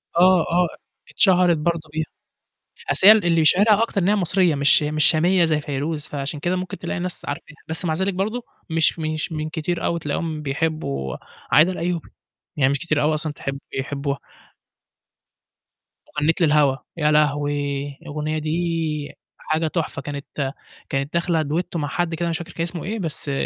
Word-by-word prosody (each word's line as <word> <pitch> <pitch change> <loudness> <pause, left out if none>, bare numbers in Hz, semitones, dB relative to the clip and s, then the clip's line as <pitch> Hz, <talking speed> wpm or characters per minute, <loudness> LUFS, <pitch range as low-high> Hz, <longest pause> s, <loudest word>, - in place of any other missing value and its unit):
آه، 180 +1 +6
آه، 175 0 +3 0.4
اتشهرت 180 -4 +4
برضه 160 0 -2
بيها. 160 0 -1 0.9
أصل 190 - +9
هي - - +13
ال 215 -4 +1
اللي 165 -2 +3
يشهرها 205 +7 +5
أكتر 215 -3 -1
إنّها 200 +4 +3
مصرية 180 -3 +2
مش 140 +1 +4
مش 150 0 +1
شامية 175 +2 +4
زي 155 -2 +1
فيروز، 145 +2 -3
فعشان 145 +1 -4
كده 175 +5 0
ممكن 185 0 -4
تلاقي 175 - -4
ناس 180 0 -5
عارفاها، 145 +1 -6
بس 160 +3 -1
مع 160 - +1
ذلك 190 +4 0
برضه 215 +6 -2 0.3
مش 165 0 +2
مش 155 +1 -3
من 155 0 -3
كتير 165 +1 -3
أوي 170 0 0
بتلاقيهم 155 0 -3
بيحبّوا 135 - -2 0.3
عايدة 160 +5 +6
الأيوبي، 175 -2 -3 0.5
يعني 135 -1 +3
مش 140 - -1
كتير 155 -3 0
أو 150 +1 +2
أصلًا 155 0 -2
تحب 135 -1 -5
بيحبّوها. 140 +1 -3 2.0
أغنية 150 +2 +3
للهوا، 150 -4 +4 0.2
يا 150 -2 +2
لهوي! 145 -1 +1
الأغنية 155 -1 -3
دي 160 -1 -2 0.2
حاجة 160 +1 -1
تحفة 155 -3 -3
كانت 140 -1 -5 0.4
كانت 135 +2 -2
داخلة 170 -2 +1
duetto 170 +4 -2
مع 145 -2 -2
حد 170 +2 -1
كده 170 +1 -2
ماش 165 0 -1
فاكر 175 -1 -8
كان - - -6
اسمه 170 0 -3
إيه، 220 +4 -3
بس 155 -5 -4
160 Hz, 165 wpm, -22 LUFS, 150-175 Hz, 2.0 s, هي